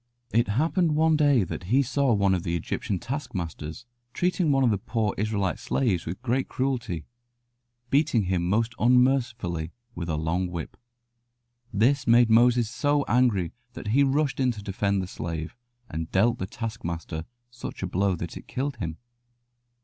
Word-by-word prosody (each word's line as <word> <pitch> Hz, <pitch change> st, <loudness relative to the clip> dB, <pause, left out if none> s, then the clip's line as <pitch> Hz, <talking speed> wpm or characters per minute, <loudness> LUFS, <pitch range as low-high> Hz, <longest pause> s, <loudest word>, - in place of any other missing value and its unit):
It 115 Hz, +2 st, +3 dB
happened 155 Hz, -, +1 dB
one 160 Hz, +1 st, +4 dB
day 145 Hz, -7 st, +4 dB
that 90 Hz, -, -6 dB
he 130 Hz, +9 st, +3 dB
saw 140 Hz, +1 st, +1 dB
one 100 Hz, -3 st, +3 dB
of 90 Hz, -, 0 dB
the 85 Hz, 0 st, -2 dB
Egyptian 105 Hz, +5 st, -2 dB
taskmasters 100 Hz, -, -5 dB, 0.3 s
treating 180 Hz, +1 st, +1 dB
one 135 Hz, -1 st, +3 dB
of 120 Hz, -, +4 dB
the 100 Hz, -, 0 dB
poor 110 Hz, 0 st, -1 dB
Israelite 105 Hz, -2 st, -1 dB
slaves 100 Hz, -12 st, 0 dB
with 95 Hz, +8 st, -5 dB
great 130 Hz, +1 st, 0 dB
cruelty, 120 Hz, -, -2 dB, 0.9 s
beating 140 Hz, -6 st, +3 dB
him 90 Hz, -2 st, 0 dB
most 115 Hz, +4 st, +1 dB
unmercifully 120 Hz, -9 st, +2 dB, 0.2 s
with 85 Hz, -4 st, -5 dB
a 80 Hz, -, 0 dB
long 85 Hz, +4 st, 0 dB
whip. 85 Hz, -2 st, -6 dB, 1.0 s
This 130 Hz, +6 st, +2 dB
made 120 Hz, 0 st, +6 dB
Moses 120 Hz, 0 st, +5 dB
so 145 Hz, +5 st, +1 dB
angry 115 Hz, -9 st, +2 dB, 0.2 s
that -, -, -6 dB
he 130 Hz, +6 st, +4 dB
rushed 140 Hz, +1 st, +1 dB
in 130 Hz, -1 st, +3 dB
to 105 Hz, -2 st, -9 dB
defend 100 Hz, -1 st, 0 dB
the -, -, -5 dB
slave, 80 Hz, -3 st, -5 dB, 0.3 s
and 80 Hz, -3 st, -5 dB
dealt 115 Hz, +5 st, +3 dB
the 95 Hz, -, -3 dB
taskmaster 85 Hz, -8 st, -5 dB, 0.3 s
such 120 Hz, -4 st, -7 dB
a -, -, 0 dB
blow 95 Hz, +1 st, +1 dB
that 85 Hz, 0 st, -6 dB
it -, -, -10 dB
killed 135 Hz, 0 st, -3 dB
him. 85 Hz, -6 st, -4 dB
110 Hz, 165 wpm, -26 LUFS, 90-130 Hz, 1.0 s, made